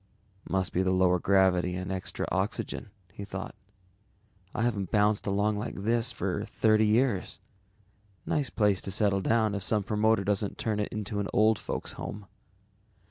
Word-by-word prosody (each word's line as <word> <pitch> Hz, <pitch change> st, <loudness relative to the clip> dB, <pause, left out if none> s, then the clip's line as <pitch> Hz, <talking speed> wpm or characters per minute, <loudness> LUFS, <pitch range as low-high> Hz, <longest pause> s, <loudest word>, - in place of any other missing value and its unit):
Must 95 Hz, -1 st, 0 dB
be 90 Hz, -, +2 dB
the 95 Hz, 0 st, +1 dB
lower 90 Hz, -1 st, +3 dB
gravity 90 Hz, -2 st, +3 dB
and 90 Hz, +1 st, -4 dB
extra 95 Hz, -1 st, -3 dB
oxygen, -, -, -2 dB, 0.2 s
he 100 Hz, -, -7 dB
thought. 95 Hz, -1 st, -6 dB, 1.0 s
_I 115 Hz, -, 0 dB
haven't 100 Hz, -6 st, -1 dB
bounced 105 Hz, 0 st, +2 dB
along 105 Hz, +1 st, +1 dB
like 110 Hz, -, -5 dB
this 115 Hz, +4 st, +1 dB
for 100 Hz, -1 st, -2 dB
thirty 110 Hz, 0 st, +2 dB
years. 110 Hz, -3 st, +1 dB, 0.9 s
Nice 145 Hz, -4 st, 0 dB
place 105 Hz, -3 st, +2 dB
to -, -, -5 dB
settle 100 Hz, -1 st, +2 dB
down 110 Hz, +1 st, +2 dB
if 100 Hz, -, -3 dB
some 105 Hz, +2 st, +1 dB
promoter 105 Hz, +1 st, +2 dB
doesn't 100 Hz, 0 st, -1 dB
turn 110 Hz, -2 st, -1 dB
it 105 Hz, -, -2 dB
into 105 Hz, 0 st, -3 dB
an 100 Hz, -, -1 dB
old 110 Hz, +1 st, +4 dB
folks -, -, -4 dB
home. 105 Hz, 0 st, -7 dB
105 Hz, 160 wpm, -28 LUFS, 95-110 Hz, 1.0 s, old